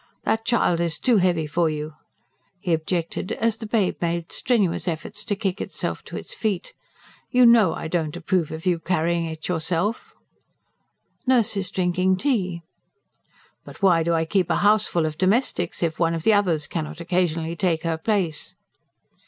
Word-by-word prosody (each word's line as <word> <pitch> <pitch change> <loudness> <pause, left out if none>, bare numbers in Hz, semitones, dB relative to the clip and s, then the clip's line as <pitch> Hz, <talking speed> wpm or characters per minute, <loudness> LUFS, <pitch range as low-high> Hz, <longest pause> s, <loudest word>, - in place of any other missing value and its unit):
That 225 0 0
child 235 -8 +2
is 165 -3 -1
too 245 -3 +3
heavy 175 -4 +2
for 165 +2 +1
you," 150 0 -4 0.7
he 180 -3 -1
objected, 165 +2 -2
as 225 -1 0
the 220 - -7
babe 210 -4 +1
made 170 -1 -2
strenuous 200 -8 0
efforts 180 +5 -4
to 205 - -1
kick 195 -1 -2
itself - - -4
to - - -7
its - - -7
feet. 200 -5 -2 0.6
"You 250 0 +5
know 225 -8 +6
I - - -5
do 170 +1 +1
not 150 0 -6
approve 175 -2 0
of 160 +1 -7
you 175 -2 +2
carrying 170 0 0
it 160 -1 -6
yourself." 175 +5 -2 1.1
"Nurse 240 -4 +3
is 195 -2 -1
drinking 185 0 +1
tea." 185 -9 -1 1.0
"But - - -13
why 175 -4 +5
do 165 +1 +1
I 160 0 +1
keep 185 +2 +1
a - - +2
houseful 210 -6 +3
of 155 0 -4
domestics 185 -3 +1
if 165 -2 -1
one 165 -1 +2
of 165 - -4
the 220 - +5
others 175 -7 +2
cannot 155 -1 -5
occasionally 170 -2 -1
take 170 -3 0
her 165 -1 -1
place?" 180 -5 -1
175 Hz, 170 wpm, -23 LUFS, 165-205 Hz, 1.1 s, know